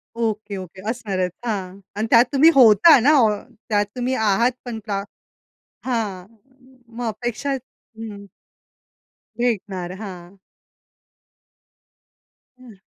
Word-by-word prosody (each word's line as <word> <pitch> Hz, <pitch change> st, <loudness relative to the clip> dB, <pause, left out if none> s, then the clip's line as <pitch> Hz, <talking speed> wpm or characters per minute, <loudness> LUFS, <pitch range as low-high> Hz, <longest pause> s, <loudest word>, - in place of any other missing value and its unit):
Okay, 215 Hz, -3 st, -3 dB
okay. 185 Hz, 0 st, -9 dB
असणारच, 195 Hz, -7 st, -2 dB
हां. 195 Hz, -4 st, -4 dB, 0.2 s
आणि 215 Hz, +2 st, -2 dB
त्यात 235 Hz, 0 st, +6 dB
तुम्ही 290 Hz, +4 st, +7 dB
होता 250 Hz, -, +7 dB
ना, 280 Hz, +6 st, +4 dB
ऑ 220 Hz, -, +5 dB, 0.4 s
त्यात 205 Hz, -1 st, +2 dB
तुम्ही 250 Hz, +1 st, -1 dB
आहात 220 Hz, +3 st, +2 dB
पण 235 Hz, -2 st, -5 dB, 1.1 s
हां 215 Hz, -8 st, -2 dB, 0.4 s
म 250 Hz, -3 st, -22 dB
मग 240 Hz, -1 st, -3 dB
अपेक्षा 240 Hz, +5 st, -3 dB
हं. 225 Hz, -5 st, -9 dB, 1.1 s
भेटणार. 195 Hz, -7 st, -2 dB
हां. 185 Hz, -2 st, -9 dB, 2.2 s
हं. 245 Hz, -4 st, -14 dB
220 Hz, 105 wpm, -21 LUFS, 200-245 Hz, 2.2 s, तुम्ही